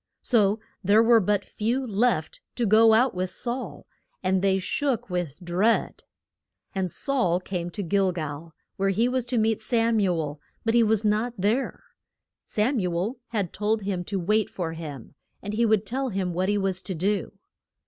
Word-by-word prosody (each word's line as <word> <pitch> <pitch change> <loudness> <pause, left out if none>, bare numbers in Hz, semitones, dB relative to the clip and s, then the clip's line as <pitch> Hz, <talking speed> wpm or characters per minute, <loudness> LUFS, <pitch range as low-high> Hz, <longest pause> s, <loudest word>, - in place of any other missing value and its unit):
So 215 -3 +3 0.2
there 205 +4 +5
were 230 0 +6
but 205 0 0
few 240 +5 -1
left 215 -7 0
to 240 - 0
go 220 +1 +6
out 250 +3 +3
with 185 0 -2
Saul, 240 - -5 0.4
and 185 0 +2
they 190 -1 +3
shook 255 +2 -2
with 175 -5 -3
dread. 190 +7 +1 0.7
And 190 -3 -2
Saul 240 - +1
came 180 -2 -4
to 205 +3 -5
Gil 195 +1 +2
gal, 155 -1 -6 0.2
where 195 0 +1
he 220 +5 +2
was 250 -1 -1
to 245 0 0
meet 220 -1 +1
Sam 230 -1 +2
u 180 -4 +1
el, 145 -1 -4 0.2
but 225 - +2
he 235 - +5
was 220 -1 +2
not 215 +3 +1
there. 215 +8 -1 0.6
Sam 235 +5 0
u 180 -3 -1
el 210 +9 -2
had 205 -7 -2
told 210 +1 0
him 190 -2 -2
to 195 0 -2
wait 210 +4 +1
for 165 -3 -4
him, 150 -7 -8 0.3
and 205 - -6
he 230 +2 +2
would 215 -1 +2
tell 265 +5 -2
him 190 -4 -2
what 185 +3 0
he 205 - +2
was 195 -2 0
to 190 - -4
do. 195 +2 -1
205 Hz, 185 wpm, -26 LUFS, 180-225 Hz, 0.7 s, were